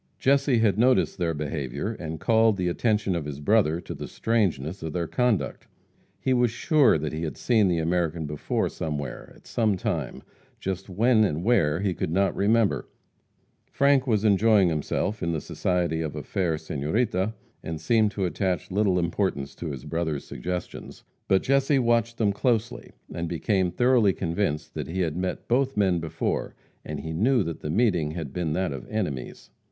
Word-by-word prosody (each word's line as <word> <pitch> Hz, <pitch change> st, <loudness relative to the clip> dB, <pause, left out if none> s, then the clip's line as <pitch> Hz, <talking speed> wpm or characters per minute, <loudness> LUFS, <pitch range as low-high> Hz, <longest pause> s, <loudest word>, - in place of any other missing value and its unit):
Jesse 140 Hz, -1 st, +3 dB
had 110 Hz, -3 st, +2 dB
noticed 125 Hz, -4 st, +3 dB
their 85 Hz, -2 st, 0 dB
behavior, 75 Hz, -, -3 dB
and 80 Hz, -6 st, -6 dB
called 110 Hz, 0 st, +3 dB
the 90 Hz, -1 st, 0 dB
attention 105 Hz, 0 st, 0 dB
of 85 Hz, -4 st, -3 dB
his 75 Hz, -1 st, -6 dB
brother 85 Hz, -1 st, +2 dB
to -, -, -7 dB
the -, -, -7 dB
strangeness 95 Hz, -7 st, -1 dB
of 80 Hz, -1 st, -5 dB
their 85 Hz, -1 st, -1 dB
conduct. 125 Hz, +3 st, -1 dB, 0.5 s
He 130 Hz, -, +1 dB
was 120 Hz, -1 st, +3 dB
sure 145 Hz, -, +3 dB
that 75 Hz, 0 st, -4 dB
he 80 Hz, -, -3 dB
had 80 Hz, -2 st, -4 dB
seen 110 Hz, -5 st, +3 dB
the 90 Hz, -2 st, +1 dB
American 85 Hz, -1 st, 0 dB
before 75 Hz, 0 st, -1 dB
somewhere, 75 Hz, -4 st, -5 dB
at -, -, -21 dB
some 110 Hz, -4 st, +1 dB
time, -, -, -3 dB, 0.4 s
just 95 Hz, +1 st, -4 dB
when 110 Hz, +4 st, +3 dB
and 85 Hz, -4 st, 0 dB
where 90 Hz, -8 st, +2 dB
he 100 Hz, -2 st, 0 dB
could -, -, -3 dB
not 95 Hz, +4 st, +1 dB
remember. 110 Hz, +1 st, +2 dB, 0.8 s
Frank 140 Hz, -1 st, +3 dB
was 110 Hz, -3 st, +1 dB
enjoying 105 Hz, -2 st, +4 dB
himself 85 Hz, +6 st, -2 dB
in 85 Hz, -1 st, -1 dB
the 80 Hz, -, -1 dB
society 85 Hz, 0 st, -1 dB
of 80 Hz, -3 st, -4 dB
a -, -, -5 dB
fair 85 Hz, -5 st, -1 dB
senorita, 95 Hz, -, -1 dB, 0.3 s
and 80 Hz, -1 st, -5 dB
seemed 110 Hz, +6 st, +3 dB
to 100 Hz, -1 st, -2 dB
attach 90 Hz, -1 st, -2 dB
little 100 Hz, -1 st, +2 dB
importance 85 Hz, -5 st, -1 dB
to 85 Hz, -, -6 dB
his 70 Hz, -2 st, -7 dB
brother's 80 Hz, -2 st, -2 dB
suggestions. 90 Hz, 0 st, -6 dB, 0.2 s
But 95 Hz, -, +3 dB
Jesse 135 Hz, +1 st, +3 dB
watched 115 Hz, -2 st, +1 dB
them 105 Hz, -3 st, +2 dB
closely, 120 Hz, +2 st, -1 dB, 0.2 s
and 85 Hz, 0 st, -3 dB
became 95 Hz, +2 st, +1 dB
thoroughly 120 Hz, -2 st, +3 dB
convinced 85 Hz, -4 st, -2 dB
that -, -, -4 dB
he 95 Hz, +3 st, -2 dB
had 80 Hz, -3 st, -1 dB
met 90 Hz, +1 st, -3 dB
both 135 Hz, +1 st, +1 dB
men 95 Hz, -4 st, +3 dB
before, 80 Hz, -1 st, -3 dB, 0.3 s
and -, -, -5 dB
he 80 Hz, -, -5 dB
knew 115 Hz, +7 st, +2 dB
that 85 Hz, -2 st, -5 dB
the 75 Hz, -, -5 dB
meeting 90 Hz, -5 st, +2 dB
had 80 Hz, -5 st, -6 dB
been 85 Hz, -4 st, -1 dB
that 90 Hz, 0 st, -1 dB
of 65 Hz, -, -8 dB
enemies. 85 Hz, -, -4 dB
95 Hz, 180 wpm, -26 LUFS, 80-110 Hz, 0.8 s, enjoying